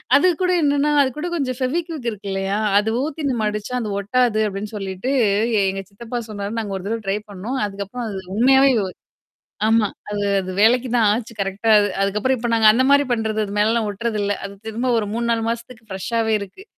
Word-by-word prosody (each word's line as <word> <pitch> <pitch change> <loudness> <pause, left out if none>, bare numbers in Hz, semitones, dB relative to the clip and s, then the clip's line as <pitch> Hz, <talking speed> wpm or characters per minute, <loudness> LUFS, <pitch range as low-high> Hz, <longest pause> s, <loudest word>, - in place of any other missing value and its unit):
அது 290 +6 +5
கூட 365 0 +2
என்னன்னா, 285 +1 +2
அது 265 - +2
கூட 320 - -3
கொஞ்சம் 255 -5 -2
ஃபெவிக்விக் 310 0 -2
இருக்கு 205 -1 -9
இல்லையா? 195 +1 -1 0.2
அது 215 +1 -1
ஊத்தி 310 0 -4
நம்ம 225 -3 -1
அடிச்சா 210 +4 -5
அது 215 - -3
ஒட்டாது 220 +1 +1
அப்டின்னு 205 +2 -5
சொல்லிட்டு 195 +4 -4 0.6
எங்க 195 0 -3
சித்தப்பா 235 +4 -6
சொன்னாருன்ன 205 +2 -4
நாங்க 205 -3 -4
ஒரு 190 - -9
தடவ 225 0 -2
ட்ரை 195 +2 +1
பண்ணோம். 225 +8 -4
அதுக்கப்புறம் 200 +4 -6
அது 195 - -5 0.2
உண்மையாவே 265 +3 +5 1.0
ஆமா. 225 -2 +4 0.2
அது 205 0 -2 0.2
அது 185 -1 -4
வேலைக்கு 245 +3 +4
தான் 230 - +4
ஆச்சு 230 +1 -3
கரெக்ட்டா 195 +3 -1
அது. 205 - +2
அதுக்கப்புறம் 210 +6 +1
இப்ப 240 - -3
நாங்க 225 -1 +5
அந்த 245 +4 +2
மாரி 285 0 +6
பண்றது. 220 -2 0
அது 200 - -7
மேலலாம் 220 +1 +2
ஒட்டுறதுல்ல. 205 -1 -1
அது 200 - -7
திரும்ப 235 +4 -2
ஒரு 220 - 0
3-4 235 -1 0
மாசத்துக்கு 230 -1 -6
ஃப்ரெஷ்ஷாவே 220 +4 -1
இருக்கு. 200 - -9
225 Hz, 185 wpm, -21 LUFS, 205-250 Hz, 1.0 s, மாரி